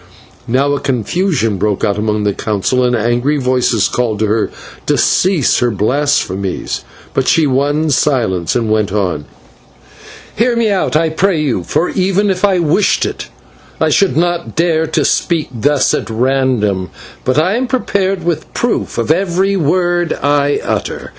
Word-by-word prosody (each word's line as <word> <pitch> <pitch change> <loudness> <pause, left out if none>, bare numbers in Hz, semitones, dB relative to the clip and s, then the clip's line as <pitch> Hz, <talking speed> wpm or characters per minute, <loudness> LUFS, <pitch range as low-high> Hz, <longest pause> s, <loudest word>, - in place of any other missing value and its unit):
Now 135 +4 +1
a 140 - -1
confusion 130 - -1
broke 105 0 -1
out 105 -2 0
among 105 0 -1
the 105 -1 +1
Council, 110 +5 -1
and 125 0 +2
angry 120 +6 0
voices 125 -5 +1
called 120 -4 -1
to 110 - 0
her 110 +1 0 0.4
to - - +2
cease 180 -8 +2
her 125 - +2
blasphemies; 105 -4 -1 0.3
but 135 - 0
she 165 -3 +3
won 145 +3 +1
silence, 110 - 0
and 115 -3 0
went 105 -2 +1
on: 90 -8 -1 1.1
"Hear 235 +2 +1
me 230 -2 +1
out, 190 -5 0
I 160 +1 +2
pray 175 +2 +1
you, 135 -12 -1
for, 160 - 0
even 195 +2 +1
if 185 0 -4
I 195 -2 +3
wished 170 +4 +2
it, - - -5 0.5
I - - +2
should 195 -4 +2
not 175 0 -1
dare 160 -1 +1
to 160 - 0
speak 165 -4 0
thus 135 +4 +1
at - - -2
random, 115 -6 0 0.3
but 130 +1 0
am 200 +11 +1
prepared 195 -7 -1
with 170 -2 -2
proof - - -1
of 115 +6 0
every 190 +3 +1
word 175 0 +1
I 145 0 +1
utter. - - -3
140 Hz, 160 wpm, -15 LUFS, 110-175 Hz, 1.1 s, she